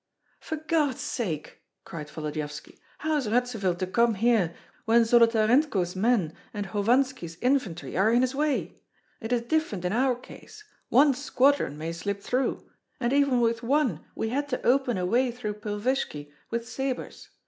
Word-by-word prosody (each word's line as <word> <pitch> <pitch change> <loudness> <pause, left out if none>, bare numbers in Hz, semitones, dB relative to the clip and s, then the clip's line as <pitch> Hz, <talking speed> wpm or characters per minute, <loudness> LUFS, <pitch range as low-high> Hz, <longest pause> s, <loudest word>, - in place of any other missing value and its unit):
"For 315 - -4
God's 305 -4 0
sake," 165 -10 -4 0.2
cried 150 -3 -7
Volodyovski, 150 -1 -6 0.2
"how 310 0 0
is 270 -6 -2
Radzivill 225 -6 0
to 185 - -1
come 230 +4 +2
here 210 -5 +2 0.3
when 230 +1 +5
Zolotarenko's 230 - +3
men 195 -5 +1 0.2
and 205 -1 -2
Hovanski's 220 -3 0
infantry 245 -10 -1
are 195 +4 +3
in 240 +1 +4
his 255 +1 0
way? 295 0 -1 0.4
It 225 +1 -6
is 240 -1 +1
different 235 - -1
in 180 - 0
our 255 +2 +2
case! 425 - -13 0.3
One 285 0 +5
squadron 270 - +1
may 160 +2 -4
slip 200 +4 -3
through, 255 +1 -1 0.3
and 240 0 0
even 280 -3 +3
with 230 -1 +1
one 250 - +1
we 220 - -2
had 285 +4 -2
to 255 - -3
open 250 -3 +2
a 180 - -1
way 245 +7 +2
through 215 -4 -5
Pilvishki 210 - -2 0.2
with 235 0 -3
sabres. 265 0 -4
235 Hz, 160 wpm, -27 LUFS, 195-265 Hz, 0.4 s, when